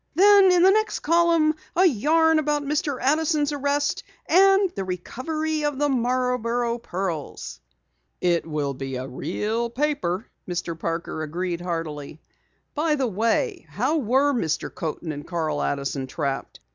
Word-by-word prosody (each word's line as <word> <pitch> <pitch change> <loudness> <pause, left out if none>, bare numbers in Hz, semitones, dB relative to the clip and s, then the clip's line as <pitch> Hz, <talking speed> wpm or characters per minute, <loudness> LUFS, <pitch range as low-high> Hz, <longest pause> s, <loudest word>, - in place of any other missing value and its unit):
Then, 395 +1 +7
in 355 -1 +4
the 380 - +7
next 435 +1 +1
column, 335 -1 +3 0.2
a 365 +3 +5
yarn 320 - +3
about 295 -1 0
Mr. 290 -1 -1
Addison's 300 +1 +1
arrest, 290 +1 0 0.2
and 390 +3 +5
the 195 - -4
recovery 305 - -3
of 295 -2 -1
the 290 +1 +1
Marborough 245 -2 0
pearls." 175 - -5 0.6
"It 175 -2 +1
will 150 -3 -2
be 135 0 -5
a 130 +1 -4
real 220 - -2
paper," 245 -7 -1 0.2
Mr. 175 -1 -3
Parker 165 -1 -3
agreed 170 +3 -3
heartily. 160 -4 -5 0.5
"By 305 0 +1
the 275 -3 0
way, 230 - 0
how 260 +9 0
were 275 +2 +2
Mr. 165 - -2
Coaten 160 0 -4
and 145 -1 -7
Carl 160 -4 -2
Addison 140 -1 -2
trapped? 135 +1 -4
250 Hz, 140 wpm, -24 LUFS, -, 0.6 s, Then